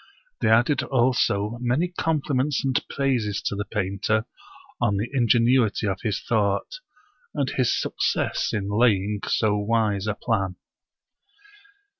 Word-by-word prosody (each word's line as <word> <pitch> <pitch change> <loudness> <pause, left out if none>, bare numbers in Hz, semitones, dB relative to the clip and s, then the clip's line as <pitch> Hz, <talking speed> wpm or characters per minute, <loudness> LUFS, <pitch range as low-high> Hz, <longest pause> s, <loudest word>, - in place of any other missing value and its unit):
They - - +1
added 120 +5 +3
also 120 -4 +1
many 130 +9 +1
compliments 150 -5 -1
and 130 -2 +1
praises 125 -7 0
to - - -2
the 105 +1 -3
painter 105 +1 -1 0.6
on 100 - +2
the 105 +4 -1
ingenuity 120 -3 +3
of 95 -2 -2
his 105 -3 -1
thought, 110 - 0 0.6
and 140 -3 0
his 125 -2 +1
success - - -1
in 100 -3 -2
laying 105 -2 +2
so 105 -1 +1
wise 105 -2 0
a 105 - -1
plan. 95 -7 -1
110 Hz, 125 wpm, -24 LUFS, 105-130 Hz, 0.6 s, added